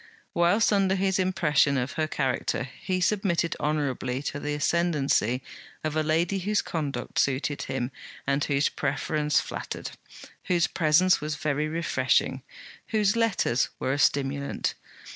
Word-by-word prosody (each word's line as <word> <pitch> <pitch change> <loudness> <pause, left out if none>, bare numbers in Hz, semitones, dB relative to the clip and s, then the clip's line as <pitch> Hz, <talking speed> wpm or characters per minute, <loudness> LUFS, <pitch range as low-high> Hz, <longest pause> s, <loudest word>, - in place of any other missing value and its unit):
Whilst 180 +6 +3
under 195 -1 +3
his 190 0 +1
impression 150 -7 +2
of 130 +3 -1
her 155 -1 -1
character, 130 -4 -1
he 185 +8 -4
submitted 180 -3 +1
honourably 140 -3 -1
to 145 - -3
the 145 0 -2
ascendancy 145 -6 +1 0.4
of 155 -1 -2
a 155 - +2
lady 165 +5 +1
whose 205 +2 0
conduct 140 -7 -3
suited 140 +1 0
him 130 0 -3 0.3
and 140 +1 +1
whose 140 0 +2
preference 150 +1 0
flattered; - - -5 0.5
whose 175 -2 +2
presence 175 +2 +3
was 150 0 -2
very 150 +1 -1
refreshing; 135 -4 +1 0.5
whose 210 -1 +2
letters 220 - +1
were 130 - -1
a 145 - -2
stimulant. 140 0 +1
150 Hz, 135 wpm, -27 LUFS, 140-175 Hz, 0.5 s, Whilst